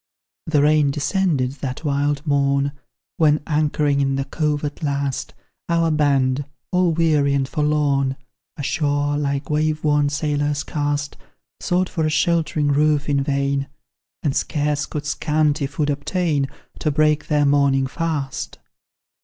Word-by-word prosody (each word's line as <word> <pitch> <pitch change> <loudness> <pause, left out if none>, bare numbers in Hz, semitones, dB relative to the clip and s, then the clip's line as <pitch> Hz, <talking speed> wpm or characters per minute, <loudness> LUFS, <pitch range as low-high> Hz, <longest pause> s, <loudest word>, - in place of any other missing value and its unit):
The 150 -3 +3
rain 150 -1 +4
descended 150 -2 0
that 130 +2 -4
wild 145 +1 0
morn 140 -1 +1 0.5
When, 150 -2 +4
anchoring 150 -2 +1
in 135 0 +1
the 135 0 -1
cove 150 0 -1
at 145 - -5
last, 140 -3 -2 0.3
Our 165 -1 +2
band, 140 -3 +2 0.3
all 180 -1 +3
weary 155 -4 +2
and 135 -1 0
forlorn 145 -3 +1 0.4
Ashore, 145 0 0
like 140 -1 -2
wave 155 0 0
worn 145 -1 +3
sailors, 145 0 -1
cast 145 -1 -2 0.4
Sought 180 +1 0
for 165 - -2
a 155 - +2
sheltering 155 -2 +1
roof 150 0 +2
in 140 -1 +2
vain, 140 0 0 0.6
And 140 -3 0
scarce 150 -1 -1
could 150 -1 -5
scanty 150 -1 0
food 145 +1 -1
obtain 145 0 0 0.3
To 155 - 0
break 150 0 +2
their 150 -2 +2
morning 140 -1 +3
fast. 145 -1 -3
145 Hz, 135 wpm, -21 LUFS, 140-155 Hz, 0.6 s, rain